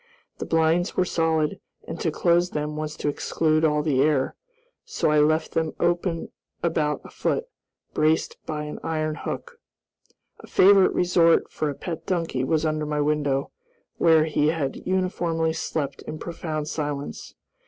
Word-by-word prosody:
The -, -, -4 dB
blinds 165 Hz, +3 st, +2 dB
were 185 Hz, -, +3 dB
solid, 160 Hz, -3 st, 0 dB, 0.3 s
and 165 Hz, -, -6 dB
to 165 Hz, -, 0 dB
close 175 Hz, +3 st, +2 dB
them 150 Hz, -1 st, -3 dB
was 155 Hz, 0 st, -4 dB
to -, -, -3 dB
exclude 155 Hz, +2 st, +1 dB
all 150 Hz, -1 st, +2 dB
the 140 Hz, -4 st, +2 dB
air, 145 Hz, -2 st, +2 dB, 0.5 s
so 440 Hz, -, 0 dB
I 150 Hz, -, +4 dB
left 155 Hz, +2 st, +2 dB
them 160 Hz, -1 st, -1 dB
open 175 Hz, -1 st, 0 dB, 0.3 s
about 155 Hz, -3 st, 0 dB
a -, -, -12 dB
foot, 460 Hz, -, -1 dB, 0.5 s
braced 155 Hz, +1 st, +1 dB
by 150 Hz, -1 st, -3 dB
an 150 Hz, -, -6 dB
iron 155 Hz, -1 st, -1 dB
hook. 470 Hz, -, -6 dB, 0.8 s
A -, -, -13 dB
favorite 195 Hz, 0 st, +5 dB
resort 170 Hz, -2 st, +3 dB
for 155 Hz, -, -2 dB
a 140 Hz, -, -4 dB
pet 165 Hz, +1 st, -6 dB
donkey 165 Hz, -8 st, -1 dB
was 155 Hz, +3 st, +1 dB
under 155 Hz, -1 st, -1 dB
my 150 Hz, 0 st, -1 dB
window, 145 Hz, -2 st, 0 dB, 0.5 s
where 160 Hz, -2 st, +5 dB
he 150 Hz, -1 st, +1 dB
had 155 Hz, -4 st, -1 dB
uniformly 175 Hz, -3 st, 0 dB
slept 145 Hz, -3 st, -3 dB
in 155 Hz, -, -5 dB
profound 155 Hz, -2 st, -4 dB
silence. 145 Hz, -2 st, -4 dB
155 Hz, 155 wpm, -25 LUFS, 150-165 Hz, 0.8 s, favorite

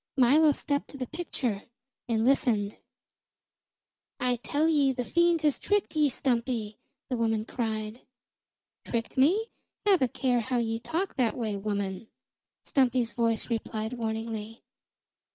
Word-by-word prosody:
Milo 290 Hz, +5 st, +6 dB
stepped 285 Hz, 0 st, -1 dB
to 280 Hz, -, -11 dB
the 255 Hz, -, -3 dB
picture 250 Hz, -, -3 dB, 0.4 s
and 225 Hz, -1 st, +1 dB
listened. 225 Hz, -6 st, +2 dB, 1.4 s
"I 250 Hz, -1 st, +1 dB
tell 290 Hz, +6 st, 0 dB
ye 290 Hz, -4 st, +3 dB
the 250 Hz, -1 st, -3 dB
fiend 340 Hz, +1 st, +3 dB
has 300 Hz, -3 st, +2 dB
tricked 410 Hz, -5 st, 0 dB
ye, 300 Hz, -2 st, +4 dB
Stumpy!" 235 Hz, -4 st, -1 dB, 0.3 s
the 250 Hz, -, 0 dB
woman 225 Hz, -2 st, 0 dB
cried. 220 Hz, -1 st, -3 dB, 0.8 s
"Tricked 230 Hz, -1 st, -3 dB
me? 365 Hz, -, +3 dB, 0.3 s
Have 390 Hz, -5 st, +5 dB
a 260 Hz, -, +4 dB
care 245 Hz, +1 st, +1 dB
how 250 Hz, +2 st, -1 dB
ye 225 Hz, -1 st, 0 dB
talk 340 Hz, +10 st, -3 dB
that 245 Hz, -4 st, +1 dB
way, 220 Hz, -4 st, -2 dB
woman!" 200 Hz, 0 st, -3 dB, 0.6 s
Stumpy's 250 Hz, -3 st, +2 dB
voice 230 Hz, 0 st, 0 dB
replied 220 Hz, 0 st, -2 dB
warningly. 225 Hz, -1 st, -4 dB
245 Hz, 135 wpm, -28 LUFS, 225-280 Hz, 1.4 s, Milo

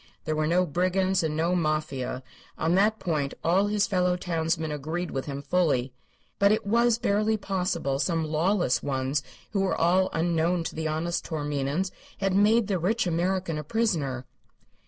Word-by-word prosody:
There 155 Hz, -, -1 dB
were 155 Hz, 0 st, 0 dB
no 180 Hz, +3 st, +3 dB
brigands 185 Hz, +3 st, +1 dB
and 155 Hz, -2 st, -1 dB
no 170 Hz, +3 st, +1 dB
Mafia; 155 Hz, -6 st, -1 dB, 0.3 s
on 160 Hz, +2 st, +1 dB
that 210 Hz, +4 st, +3 dB
point 150 Hz, -8 st, -2 dB
all 185 Hz, +5 st, +3 dB
his 205 Hz, -1 st, +2 dB
fellow 180 Hz, -2 st, +1 dB
townsmen 165 Hz, -2 st, -1 dB
agreed 160 Hz, +5 st, -3 dB
with 135 Hz, -, -3 dB
him 140 Hz, 0 st, -5 dB
fully. 140 Hz, -6 st, +1 dB, 0.5 s
But 200 Hz, 0 st, +5 dB
it 215 Hz, -, +1 dB
was 235 Hz, +2 st, +3 dB
barely 215 Hz, 0 st, +1 dB
possible 180 Hz, -8 st, -1 dB
some 165 Hz, 0 st, 0 dB
lawless 165 Hz, 0 st, +1 dB
ones 135 Hz, +1 st, -1 dB, 0.3 s
who 200 Hz, -, 0 dB
were 195 Hz, -, +1 dB
all 185 Hz, +3 st, +3 dB
unknown 170 Hz, +1 st, +1 dB
to -, -, -5 dB
the 160 Hz, 0 st, -2 dB
honest 165 Hz, +3 st, -1 dB
Taorminians 150 Hz, +3 st, -2 dB, 0.3 s
had 195 Hz, -1 st, 0 dB
made 215 Hz, +3 st, +4 dB
the 195 Hz, -3 st, -1 dB
rich 215 Hz, +6 st, +1 dB
American 175 Hz, -1 st, 0 dB
a -, -, -5 dB
prisoner. 150 Hz, -, -1 dB
170 Hz, 165 wpm, -27 LUFS, 155-190 Hz, 0.5 s, But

